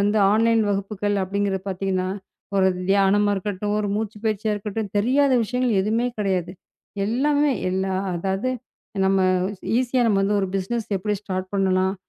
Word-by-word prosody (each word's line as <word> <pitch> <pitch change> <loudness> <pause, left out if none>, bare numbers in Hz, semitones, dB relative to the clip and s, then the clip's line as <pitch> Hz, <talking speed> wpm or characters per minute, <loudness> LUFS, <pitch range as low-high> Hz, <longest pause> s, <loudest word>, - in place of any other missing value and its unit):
வந்து 205 +2 +2
ஆன்லைன் 225 +1 +3
வகுப்புகள் 205 +1 -1
அப்டிங்கறத 195 0 -1
பாத்தீங்கன்னா 185 -1 -1 0.5
ஒரு 190 -1 +4 0.2
தியானமா 200 +1 +3
இருக்கட்டும், 205 +1 -2
ஒரு 210 - -1
மூச்சுப்பயிற்சியா 215 0 -2
இருக்கட்டும் 205 0 -4
தெரியாத 270 +6 +3
விஷயங்கள் 250 -2 0
எதுவுமே 225 +4 0
கிடையாது. 185 -4 -1 0.5
எல்லாமே 290 +5 +2 0.2
எல்லாம் 190 0 -1
அதாவது 195 +7 -1 0.5
நம்ம 190 0 +3 0.6
ஈசியா 255 0 +1
நம்ம 195 -2 +2 0.2
ஒரு 190 - -1
பிஸ்னஸ் 215 +4 -3
எப்படி 210 +3 -1
ஸ்டார்ட் 185 -2 -4
பண்ணலாம். 190 0 +2
205 Hz, 130 wpm, -23 LUFS, 190-220 Hz, 0.6 s, ஒரு